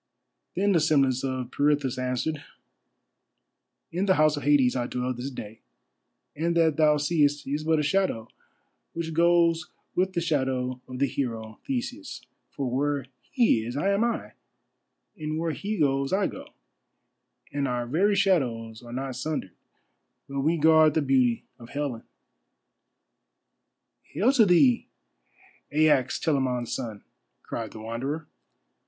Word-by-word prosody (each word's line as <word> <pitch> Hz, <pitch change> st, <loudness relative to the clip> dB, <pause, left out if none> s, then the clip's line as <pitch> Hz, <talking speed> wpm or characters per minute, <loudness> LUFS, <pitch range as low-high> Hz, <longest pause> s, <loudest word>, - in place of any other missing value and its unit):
Then 200 Hz, +2 st, +2 dB
the 175 Hz, -, +4 dB
semblance 140 Hz, -5 st, +2 dB
of 130 Hz, -2 st, -3 dB
Pirithous 145 Hz, -3 st, +1 dB
answered: 130 Hz, +4 st, -2 dB, 1.5 s
"In 180 Hz, +4 st, -1 dB
the 190 Hz, -, +5 dB
House 155 Hz, 0 st, +4 dB
of 145 Hz, -, -5 dB
Hades 140 Hz, -4 st, +3 dB
I 120 Hz, -1 st, -1 dB
dwell 125 Hz, 0 st, -2 dB
this 125 Hz, +3 st, -5 dB
day, 110 Hz, -4 st, -9 dB, 0.8 s
and 170 Hz, +3 st, 0 dB
that 160 Hz, -3 st, +3 dB
thou 150 Hz, -1 st, +4 dB
seest 145 Hz, -1 st, +1 dB
is 145 Hz, +3 st, -2 dB
but 160 Hz, 0 st, +2 dB
a 150 Hz, -, +1 dB
shadow 150 Hz, -, 0 dB, 0.7 s
which 165 Hz, -1 st, -4 dB
goes 170 Hz, 0 st, +3 dB, 0.2 s
with 185 Hz, +1 st, 0 dB
the 170 Hz, -, 0 dB
shadow 130 Hz, -5 st, -1 dB
of 130 Hz, -, -7 dB
the 140 Hz, -, +2 dB
hero 115 Hz, -5 st, -4 dB
Theseus. 265 Hz, -, -4 dB, 0.2 s
For 140 Hz, -2 st, -4 dB
where 140 Hz, +2 st, -1 dB, 0.2 s
he 230 Hz, -, +3 dB
is 120 Hz, +4 st, -5 dB
am 200 Hz, +7 st, +2 dB
I, 235 Hz, 0 st, -2 dB, 0.9 s
and 155 Hz, 0 st, -3 dB
where 165 Hz, 0 st, -1 dB
he 205 Hz, +6 st, -4 dB
goes 135 Hz, -3 st, +1 dB
I 195 Hz, +1 st, +2 dB
go, -, -, -6 dB, 1.1 s
and 140 Hz, -1 st, 0 dB
our 125 Hz, -1 st, -1 dB
very 185 Hz, +11 st, +2 dB
shadows 125 Hz, -, 0 dB
are 120 Hz, -1 st, -11 dB
not 130 Hz, +1 st, -4 dB
sundered; 130 Hz, -, -4 dB, 0.7 s
but 140 Hz, 0 st, -4 dB
we 160 Hz, +5 st, +2 dB
guard 155 Hz, -1 st, +5 dB
the 160 Hz, -, +2 dB
beauty 130 Hz, -4 st, +2 dB, 0.2 s
of 120 Hz, 0 st, -12 dB
Helen." 140 Hz, -5 st, -3 dB, 2.0 s
"Hail 250 Hz, +7 st, +1 dB
to 230 Hz, -6 st, +5 dB
thee, 230 Hz, +8 st, +4 dB, 0.8 s
Aias, 150 Hz, -4 st, +3 dB
Telamon's 130 Hz, -6 st, 0 dB
son," 110 Hz, -5 st, -5 dB, 0.4 s
cried 115 Hz, -2 st, -5 dB
the 110 Hz, -, -10 dB
Wanderer. 135 Hz, +8 st, -4 dB
145 Hz, 140 wpm, -26 LUFS, 125-165 Hz, 2.0 s, the